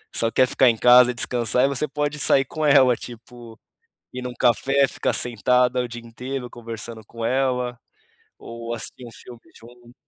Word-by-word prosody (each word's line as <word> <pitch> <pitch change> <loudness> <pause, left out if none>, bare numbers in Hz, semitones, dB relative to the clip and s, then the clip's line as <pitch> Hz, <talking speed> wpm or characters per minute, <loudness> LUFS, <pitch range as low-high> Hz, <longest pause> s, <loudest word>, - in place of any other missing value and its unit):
só 115 - +1
quer 130 - +3
ficar 130 0 +3
em 115 - 0
casa 125 +1 +6
e - - -10
descansar 120 +1 +1
e - - +1
você 140 +2 -2
pode 150 +1 -3
sair 135 -1 +3
com 155 +4 -6
ela 130 -4 +5
tipo, 120 -1 -12 0.5
ir 125 - -6
num 125 0 -6
café, 135 +3 +2
ficar - - -2
sentada 125 +2 +1
o 125 - -4
dia 120 0 -8
inteiro 125 +3 -7
conversando 115 -1 -8
com 115 -1 -6
ela, 125 -1 -1 0.6
ou 115 0 -7
assistir 120 +2 -9
um 115 - -12
filme 120 0 -14 0.2
junto. 120 +1 -17
125 Hz, 180 wpm, -22 LUFS, 115-130 Hz, 0.6 s, casa